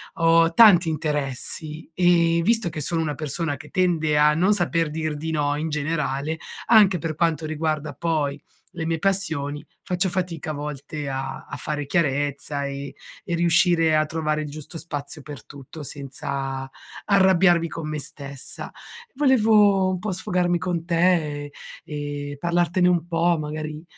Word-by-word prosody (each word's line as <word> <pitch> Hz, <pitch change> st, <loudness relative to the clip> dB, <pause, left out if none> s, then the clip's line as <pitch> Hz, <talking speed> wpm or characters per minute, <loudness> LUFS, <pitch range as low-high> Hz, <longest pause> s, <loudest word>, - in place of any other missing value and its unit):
ho 165 Hz, 0 st, +4 dB
tanti 185 Hz, -7 st, +7 dB
interessi 150 Hz, +1 st, -3 dB
e 170 Hz, -1 st, +3 dB
visto 225 Hz, 0 st, +2 dB
che 155 Hz, -2 st, -4 dB
sono 165 Hz, +3 st, -1 dB
una 150 Hz, -2 st, -2 dB
persona 155 Hz, +1 st, -2 dB
che 140 Hz, -, -12 dB
tende 165 Hz, -5 st, +1 dB
a 150 Hz, 0 st, +5 dB
non 185 Hz, +5 st, +3 dB
saper 165 Hz, -4 st, 0 dB
dir 155 Hz, -1 st, -2 dB
di 160 Hz, +2 st, -4 dB
no, 145 Hz, -2 st, 0 dB
in 155 Hz, +2 st, -2 dB
generale, 150 Hz, 0 st, -2 dB, 0.3 s
anche 210 Hz, -5 st, +6 dB
per 160 Hz, -1 st, -4 dB
quanto 165 Hz, -1 st, 0 dB
riguarda 155 Hz, -1 st, -2 dB
poi 150 Hz, -3 st, -1 dB, 0.3 s
le 160 Hz, -, -5 dB
mie 165 Hz, 0 st, -1 dB
passioni, 160 Hz, -6 st, -1 dB, 0.2 s
faccio 180 Hz, +1 st, -1 dB
fatica 175 Hz, -4 st, -3 dB
a -, -, -4 dB
volte 145 Hz, 0 st, -6 dB
a 135 Hz, 0 st, -5 dB
a -, -, -7 dB
fare 150 Hz, -1 st, -3 dB
chiarezza 145 Hz, -1 st, -1 dB
e 140 Hz, 0 st, -5 dB, 0.3 s
e 175 Hz, -, -4 dB
riuscire 170 Hz, -1 st, +3 dB
a 155 Hz, 0 st, +3 dB
trovare 155 Hz, -1 st, -1 dB
il 150 Hz, -, -5 dB
giusto 155 Hz, +3 st, -8 dB
spazio 150 Hz, -1 st, -6 dB
per 145 Hz, -4 st, -10 dB
tutto 140 Hz, +2 st, -10 dB
senza 135 Hz, -1 st, -5 dB, 0.4 s
arrabbiarmi 190 Hz, -4 st, +4 dB
con 160 Hz, -1 st, -6 dB
me 155 Hz, -, -3 dB
stessa. 140 Hz, -2 st, -7 dB, 0.5 s
Volevo 215 Hz, -8 st, +4 dB
un 185 Hz, -1 st, -2 dB
po' 210 Hz, +2 st, -3 dB
sfogarmi 180 Hz, -1 st, 0 dB
con 175 Hz, -2 st, -2 dB
te 175 Hz, +2 st, +3 dB, 0.3 s
e 145 Hz, -, -11 dB, 0.4 s
e 145 Hz, -1 st, -5 dB
parlartene 175 Hz, +2 st, +2 dB
un 175 Hz, -2 st, +1 dB
po', 170 Hz, 0 st, +2 dB
magari 155 Hz, 0 st, -5 dB
160 Hz, 155 wpm, -23 LUFS, 145-175 Hz, 0.5 s, tanti